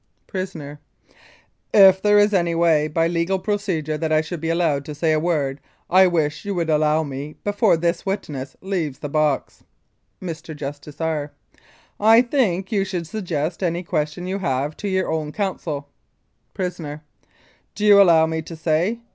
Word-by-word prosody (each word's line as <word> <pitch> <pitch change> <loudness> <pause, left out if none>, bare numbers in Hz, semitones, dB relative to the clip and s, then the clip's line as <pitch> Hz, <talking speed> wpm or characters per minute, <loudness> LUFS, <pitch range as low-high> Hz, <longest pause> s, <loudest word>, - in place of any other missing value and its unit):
PRISONER: 160 -7 -6 1.0
If 190 -2 +7
there 210 +1 +4
was 205 0 +5
any 170 -3 +1
way, 165 -3 +3
by 165 +2 +1
legal 170 +3 0
procedure, 185 -6 -2
that 160 0 -2
I 155 0 +4
should 160 +1 -6
be 165 - -2
allowed 165 -4 +1
to 150 - -7
say 160 +2 +1
a 155 - +2
word, 150 -5 -1 0.3
I 185 +1 +7
wish 155 -4 -1
you 200 -1 -3
would 165 -2 0
allow 155 +1 +2
me 145 +1 -6
before 205 -3 +2
this 170 +1 -1
witness 150 -9 -4
leaves 175 -8 -2
the 145 - -6
box. 150 -1 -1 0.6
Mr. 160 -3 -7
JUSTICE 145 0 -8
R.: 155 -3 -2 0.7
I 225 +3 +6
think 220 -7 0
you 200 -3 +2
should 185 -3 -4
suggest 175 -4 -3
any 175 -1 -1
question 155 0 -2
you 190 +2 -3
have 140 -3 -1
to 205 - -4
your 190 -1 0
own 155 -2 -2
counsel. 160 -7 -3 0.7
PRISONER: 165 -5 -5 0.7
Do 210 - -2
you 205 -1 +8
allow 165 -4 +6
me 160 0 -2
to 165 +1 -9
say? 165 +8 0
165 Hz, 165 wpm, -22 LUFS, 150-190 Hz, 1.0 s, you